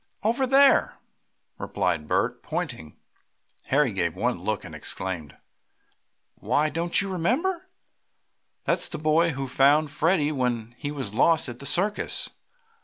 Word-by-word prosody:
"Over 240 +5 +1
there," 275 +2 +4 0.6
replied 75 -2 -2
Bert, - - 0
pointing. 80 -1 -5 0.7
Harry 135 -4 +2
gave 85 -4 -1
one - - -1
look, - - -2
and - - -10
exclaimed: 90 -6 -4 1.0
"Why, 155 +1 +1
don't 170 +5 +1
you 195 - -4
remember? 325 - -1 0.9
That's - - 0
the - - -5
boy 160 +2 +2
who 135 0 -4
found 140 +3 +3
Freddie 155 0 +1
when 120 -4 -2
he 145 - -4
was 135 -8 -5
lost 155 +4 +3
at 120 0 -9
the 140 - -6
circus!" 205 +4 +1
150 Hz, 130 wpm, -25 LUFS, 125-175 Hz, 1.0 s, there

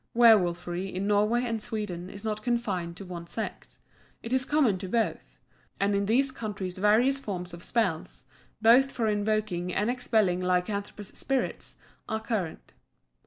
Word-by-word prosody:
Werwolfery 185 -6 +4
in 190 +1 -3
Norway 210 +4 +2
and 225 -2 -2
Sweden 205 -6 -4
is 200 +2 -9
not 215 -1 -2
confined 200 -8 -2
to 195 - -8
one 170 -2 -7
sex; 220 - -6 0.5
it 230 - -4
is 260 0 +3
common 265 -11 +2
to 190 - -5
both; 230 +2 -1 0.4
and 200 +1 +2
in 200 0 0
these 265 +5 +3
countries 200 -6 -5
various 235 +7 +4
forms 180 -8 -5
of 170 0 -9
spells, 190 -9 -1 0.4
both 250 +4 +6
for 230 -2 -1
invoking 205 -4 0
and 210 +6 +1
expelling 215 -7 +1
lycanthropous 195 +3 -1
spirits, 270 -2 -2 0.3
are 220 - -1
current. 205 -8 -4
210 Hz, 150 wpm, -28 LUFS, 185-230 Hz, 0.5 s, both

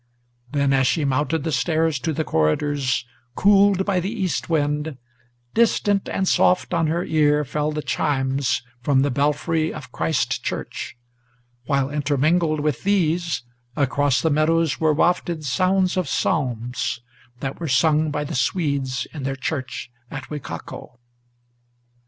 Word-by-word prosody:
Then, 140 -1 +2
as 130 -1 +3
she 155 +1 +1
mounted 145 +3 0
the 160 - -2
stairs 160 +1 +1
to 160 - -1
the 160 +1 -1
corridors, 130 - 0 0.3
cooled 200 -1 +4
by 195 -3 +1
the 180 +2 -2
east 190 -8 -2
wind, 150 -2 0 0.6
Distant 205 -3 +2
and 190 - -1
soft 180 0 +3
on 165 -2 +2
her 170 +3 0
ear 150 -1 +2
fell 150 +3 -1
the 150 0 -3
chimes 135 -4 0 0.2
from 135 +1 +3
the 145 - +1
belfry 150 +4 0
of 135 -5 -9
Christ 160 - -1
Church, - - -5 0.7
While, 140 -1 +1
intermingled 150 +2 +1
with 150 -3 -1
these, 170 -7 +1 0.3
across 140 -3 +1
the 160 - +2
meadows 160 +1 +2
were 155 -1 +3
wafted 170 0 +1
Sounds 185 +6 +2
of 185 - 0
psalms, 125 -3 -1 0.4
that 135 +1 -4
were 170 - -3
sung 155 +3 +3
by 150 0 -2
the 150 +3 -5
Swedes 140 -9 0
in 150 - -6
their 135 0 -2
church 130 -3 -4 0.2
at - - -8
Wicaco. 120 - -7
150 Hz, 140 wpm, -22 LUFS, 135-165 Hz, 0.7 s, cooled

